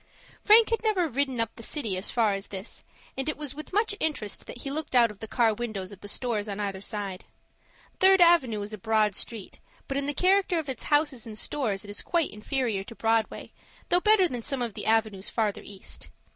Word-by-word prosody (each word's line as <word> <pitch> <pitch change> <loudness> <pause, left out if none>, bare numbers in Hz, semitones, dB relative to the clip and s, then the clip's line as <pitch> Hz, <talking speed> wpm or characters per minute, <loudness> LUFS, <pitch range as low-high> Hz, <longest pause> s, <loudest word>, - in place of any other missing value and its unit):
Frank 440 +2 +7
had 455 - +1
never 410 -6 +2
ridden 265 -2 -1
up 230 -1 -1
the - - -10
city 225 -5 -2
as 185 +2 -2
far 225 -4 +2
as 195 0 -5
this, 195 +2 -8 0.3
and 270 +3 -2
it 305 - -3
was 295 -3 -4
with 305 +2 -9
much 425 +2 +2
interest 280 -10 -3
that 245 - -8
he 275 - -4
looked 305 -2 -3
out 235 -3 +5
of 205 - -15
the 220 - -6
car 230 -1 +2
windows 210 -4 -5
at 200 - -12
the - - -9
stores 215 -1 -2
on 200 0 -4
either 195 -2 -3
side. 200 -3 -5 0.7
Third 385 0 +6
Avenue 275 -12 +5
is 210 +2 -6
a 215 - -6
broad 215 0 +2
street, 220 -5 -4 0.3
but 275 - -2
in 280 0 -1
the 290 - -2
character 375 -1 +3
of 310 -4 -3
its 260 - -5
houses 290 -5 +1
and 215 -1 -7
stores 215 -7 -2
it 205 - -11
is 205 - -4
quite 340 -3 0
inferior 215 -2 -2
to 230 - -10
Broadway, 225 -1 0 0.4
though 355 - +4
better 420 -3 +5
than 245 -7 -5
some 270 0 -2
of 230 -3 -4
the - - -6
avenues 220 -3 +1
further 215 -3 -1
east. 200 -2 -9
235 Hz, 225 wpm, -27 LUFS, 210-300 Hz, 0.7 s, Frank